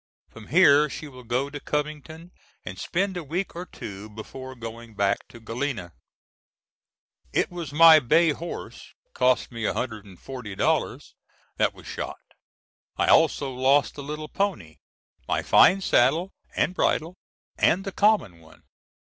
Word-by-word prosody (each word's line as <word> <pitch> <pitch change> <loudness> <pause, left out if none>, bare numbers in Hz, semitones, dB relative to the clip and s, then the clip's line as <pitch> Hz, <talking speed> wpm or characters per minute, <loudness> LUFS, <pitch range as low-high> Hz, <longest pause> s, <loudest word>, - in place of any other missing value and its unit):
From 110 -2 -13
here 150 -2 +5
she 155 - -7
will 130 -3 -12
go 125 +4 -1
to 145 - -6
Covington, 155 +4 -5 0.3
and 95 +1 -7
spend 190 - -1
a 175 - -4
week 170 +7 -4
or 180 +2 -6
two 100 +1 -9
before 130 +5 -9
going 115 -1 -9
back 100 -1 0
to 120 - -14
Galena. 115 - -4 1.4
It - - 0
was 170 -5 -6
my 160 +1 +8
bay 160 +5 +3
horse 170 +4 -8 0.2
(cost 130 0 +1
me 115 -1 -7
$140) 105 -1 -3 0.4
that - - +2
was - - -15
shot. - - -5 0.8
I - - +1
also 145 -4 +3
lost 135 +3 +2
the 145 - -8
little 150 +2 -6
pony, 155 - -3 0.5
my - - 0
fine 195 +1 +5
saddle 160 +5 +2 0.2
and - - +1
bridle, 175 0 0 0.4
and 185 +4 +3
the 195 - -5
common 185 - +2
one. 80 -1 -19
140 Hz, 140 wpm, -25 LUFS, 115-165 Hz, 1.4 s, my